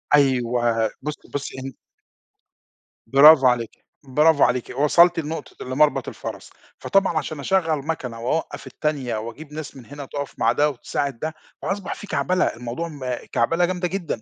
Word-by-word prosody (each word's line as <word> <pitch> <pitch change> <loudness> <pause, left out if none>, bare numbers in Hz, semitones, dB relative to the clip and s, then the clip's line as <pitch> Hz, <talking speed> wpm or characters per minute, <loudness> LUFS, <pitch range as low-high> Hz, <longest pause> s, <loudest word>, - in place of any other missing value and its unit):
أيوه، 120 -4 +2
بُصي، 150 +1 -6
بُصي 140 -2 -4
إن 135 -1 -6 1.3
برافو 140 +1 +8
عليكِ، 120 -2 -1 0.2
برافو 150 +3 +4
عليكِ 125 -1 +1
وصلْتِ 170 +3 +5
لنقطة 160 -3 -6
لمَرْبَط 135 0 +2
الفَرَس، - - -7 0.3
فطبعًا 195 -4 +2
عشان 155 0 -3
أشغّل 160 -3 0
مَكَنة، 125 -8 -4
وأوقّف 160 +7 -2
التانية، 140 -7 -2
وأجيب 130 +8 -8
ناس 155 -2 -7
من 125 - -12
هنا 145 -1 -8
تقف 140 0 -5
مع - - +4
ده، 150 +1 +2
وتساعد 140 -1 -3
ده، 155 0 -3 0.3
فأصبح 195 -1 -3
في 205 - -10
كعْبلة 185 -2 +1
الموضوع 125 +8 -4
م 130 -5 -5 0.2
كعْبلة 165 +9 +2
جامدة 180 0 -1
جدًا 175 - -4
145 Hz, 150 wpm, -23 LUFS, 125-160 Hz, 1.3 s, برافو